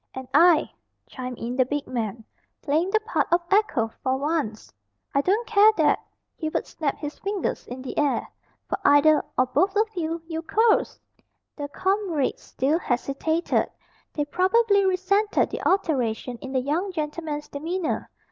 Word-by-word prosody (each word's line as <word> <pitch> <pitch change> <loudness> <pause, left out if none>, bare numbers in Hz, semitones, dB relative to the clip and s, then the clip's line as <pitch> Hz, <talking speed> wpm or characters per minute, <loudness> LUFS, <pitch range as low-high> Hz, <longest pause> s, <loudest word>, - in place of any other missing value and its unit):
"And 260 -1 -6
I," 330 +2 +5 0.4
chimed 250 -1 -6
in 240 +2 -4
the 260 - +4
big 290 +3 -3
man, 225 -2 -4 0.4
playing 315 +5 +1
the 435 - +3
part 440 - 0
of 345 - +5
echo 390 - +2
for 260 0 0
once. 285 -7 -2 0.4
"I 280 - +3
don't 410 +9 +1
care 430 -1 +6
that," 305 -3 +3 0.3
Hubert 315 -1 -2
snapped 295 -4 -3
his 295 -1 -6
fingers 400 -2 -3
in 255 +1 -7
the 265 - -6
air, 290 -2 +1 0.4
"for - - -2
either, 295 +2 +5
or 255 - +4
both 385 +10 +1
of 430 +2 +3
you, 330 -1 -2
you 325 -1 -4
curs!" 440 +6 +2 0.6
The 290 -1 -5
comrades 370 -2 -1
still 290 +6 0
hesitated 280 +5 0 0.4
they 295 - -2
probably 400 +5 +3
resented 395 +3 +1
the - - -4
alteration 250 - 0
in 265 - -7
the 260 -1 +1
young 325 +9 -1
gentleman's 300 -2 -4
demeanour. 330 +4 -3
310 Hz, 155 wpm, -25 LUFS, 270-375 Hz, 0.6 s, care